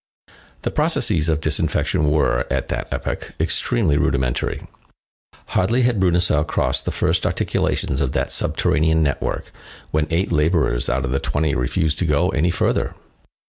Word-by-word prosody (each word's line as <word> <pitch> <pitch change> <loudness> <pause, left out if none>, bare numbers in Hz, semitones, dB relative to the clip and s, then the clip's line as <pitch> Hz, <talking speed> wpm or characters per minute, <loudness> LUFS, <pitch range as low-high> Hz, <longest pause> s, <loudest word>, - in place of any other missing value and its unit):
The - - -1
processes 80 0 +1
of 80 -1 0
disinfection 75 -1 +1
were, 75 -5 +1
at - - -1
that - - -3
epoch, - - -4
extremely 70 +4 +1
rudimentary. 65 -4 -1 0.8
Hardly 115 +7 +1
had 120 -4 +1
Bruneseau 90 -4 +3
crossed 65 -4 0
the - - -1
first - - 0
articulations 70 0 -1
of 70 -3 0
that - - -1
subterranean 80 +1 +1
network, 70 -2 -2 0.4
when 75 0 0
eight 85 +4 0
laborers 75 -6 +1
out - - 0
of 65 - -3
the 70 - 0
twenty 75 +1 -1
refused 75 +5 0
to 90 - 0
go 75 +4 +2
any 80 +1 +1
further. 90 - 0
75 Hz, 145 wpm, -21 LUFS, 70-85 Hz, 0.8 s, Bruneseau